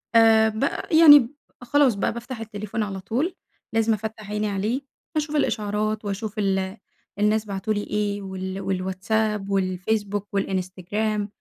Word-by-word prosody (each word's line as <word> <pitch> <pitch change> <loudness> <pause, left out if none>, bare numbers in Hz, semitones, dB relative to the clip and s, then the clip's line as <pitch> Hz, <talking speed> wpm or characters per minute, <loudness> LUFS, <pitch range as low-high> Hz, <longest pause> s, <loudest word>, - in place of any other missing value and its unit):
آآ 225 -1 +6
ب 220 +5 -3 0.3
يعني 315 -2 +10
ب 235 -3 -2 0.3
خلاص 255 -2 +3
بقى 200 - 0
بافتح 235 0 -7
التليفون 215 0 -4
على 195 -2 -4
طول، 265 - -2 0.4
لازم 225 0 +3
أفتح 215 -1 -5
عيني 210 0 -1
عليه 210 +7 -1 0.4
أشوف 305 0 -1
الإشعارات 215 -4 0
وأشوف 205 +2 -4
ال 195 0 0 0.4
الناس 210 +1 +2
بعتوا 200 +1 -2
لي 205 -1 -2
إيه 205 -1 -2
وال 190 -1 -5 0.2
الWhatsApp 210 +3 -1
والFacebook 195 +2 -1
والInstagram، 195 +3 -2
210 Hz, 135 wpm, -24 LUFS, 195-225 Hz, 0.4 s, يعني